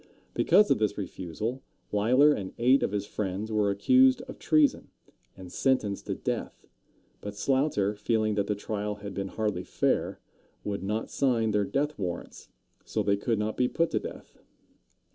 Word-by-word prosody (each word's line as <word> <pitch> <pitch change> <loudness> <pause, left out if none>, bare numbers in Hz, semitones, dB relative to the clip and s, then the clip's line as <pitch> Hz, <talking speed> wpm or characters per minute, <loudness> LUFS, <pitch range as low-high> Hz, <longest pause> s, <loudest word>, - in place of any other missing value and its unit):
Because 210 0 +4
of - - +3
this 105 -1 0
refusal, 105 +6 -4 0.3
Leisler 125 +8 +5
and 95 -7 -5
eight 130 +3 +4
of - - 0
his 100 -1 -2
friends 105 +1 -4
were 105 -2 +2
accused 255 - +4
of 260 - -10
treason, 155 -3 +2 0.5
and 90 -2 -10
sentenced 110 -6 0
to - - -1
death. - - -4 0.6
But 105 0 -6
Sloughter, 130 -5 +1
feeling 110 0 0
that 100 -1 0
the 105 - 0
trial 105 0 -3
had 100 -1 -8
been 100 +1 -3
hardly 105 -3 -2
fair, - - 0 0.4
would 100 -1 -3
not 105 +3 -3
sign 115 -5 +1
their 105 -1 +1
death 145 +5 -1
warrants, 90 -3 -5 0.3
so - - -2
they 100 0 +2
could 115 +3 -1
not 105 +1 -2
be 125 - +3
put 165 +5 0
to - - +1
death. - - -10
105 Hz, 165 wpm, -28 LUFS, 100-130 Hz, 0.6 s, Leisler